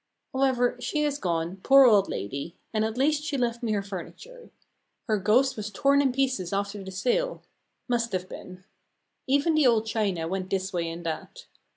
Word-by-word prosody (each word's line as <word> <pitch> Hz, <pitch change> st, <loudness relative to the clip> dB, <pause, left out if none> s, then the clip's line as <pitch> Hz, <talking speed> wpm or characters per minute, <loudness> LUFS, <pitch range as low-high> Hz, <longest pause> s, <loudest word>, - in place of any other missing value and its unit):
However, 260 Hz, -2 st, +1 dB
she 300 Hz, -1 st, -1 dB
is 290 Hz, -1 st, -1 dB
gone, 170 Hz, -, -2 dB
poor 270 Hz, +7 st, +6 dB
old 205 Hz, -5 st, +5 dB
lady, 140 Hz, +10 st, -5 dB, 0.2 s
and 215 Hz, -1 st, +1 dB
at 220 Hz, +1 st, -2 dB
least 295 Hz, +3 st, +2 dB
she 300 Hz, -2 st, -2 dB
left 235 Hz, -2 st, -1 dB
me 230 Hz, -3 st, -1 dB
her 200 Hz, -1 st, -1 dB
furniture. 440 Hz, -, -9 dB, 0.6 s
Her 215 Hz, -3 st, +1 dB
ghost 240 Hz, +8 st, +3 dB
was 215 Hz, -1 st, -5 dB
torn 280 Hz, +7 st, +3 dB
in 270 Hz, -2 st, +2 dB
pieces 255 Hz, -9 st, -1 dB
after 200 Hz, 0 st, -2 dB
the 190 Hz, -, -8 dB
sale 250 Hz, -, -1 dB, 0.4 s
must 235 Hz, -2 st, 0 dB
have 185 Hz, 0 st, -2 dB
been. 185 Hz, -1 st, -10 dB, 0.6 s
Even 285 Hz, +5 st, +2 dB
the 310 Hz, -4 st, +4 dB
old 225 Hz, -2 st, +3 dB
china 200 Hz, -7 st, -1 dB
went 185 Hz, +1 st, -3 dB
this 190 Hz, 0 st, -2 dB
way 170 Hz, -2 st, -1 dB
and 170 Hz, +1 st, -7 dB
that. 160 Hz, -1 st, -5 dB
220 Hz, 185 wpm, -27 LUFS, 190-270 Hz, 0.6 s, poor